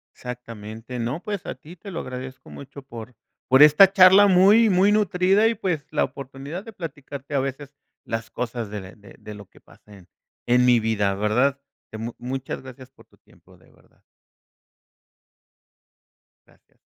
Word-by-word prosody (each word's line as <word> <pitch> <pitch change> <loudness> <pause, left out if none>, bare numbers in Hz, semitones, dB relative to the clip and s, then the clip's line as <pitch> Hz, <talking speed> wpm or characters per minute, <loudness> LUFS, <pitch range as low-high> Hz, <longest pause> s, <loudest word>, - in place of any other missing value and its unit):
Exactamente. 115 -1 -9
No, 120 +8 -3
pues 205 -4 -5
a - - -5
ti 165 +4 -14
te 190 +3 -12
lo 165 - -5
agradezco 130 +1 -9
mucho 140 +1 -11
por 120 -2 -11 0.3
por 130 +2 +5
esta 150 +6 +8
charla 190 +1 +7
muy, 200 +4 +5
muy 190 +3 +3
nutrida, 200 0 +2
y 230 - +1
pues, 180 -9 -3
la - - +1
oportunidad 140 +6 -9
de 225 - -12
platicarte 145 -5 -8
a - - +2
veces 135 +1 -5 0.3
las 115 0 -5
cosas 120 -3 -5
de 105 -1 -6
de 100 -3 -17
de 105 - -10
lo 100 -1 -12
que - - -21
pasa 105 - -19
en 90 -2 -19 0.4
en 125 +1 +3
mi 125 -1 +5
vida, 105 -3 0
¿verdad?, 120 +7 +1 0.3
de 110 - -8
mu 115 +1 -5
muchas 130 +1 -5
gracias 130 0 -13
por - - -21
tu - - -28
tiempo, - - -23
de - - -25
verdad. - - -28 2.5
Gracias. - - -30
135 Hz, 165 wpm, -23 LUFS, 115-180 Hz, 2.5 s, esta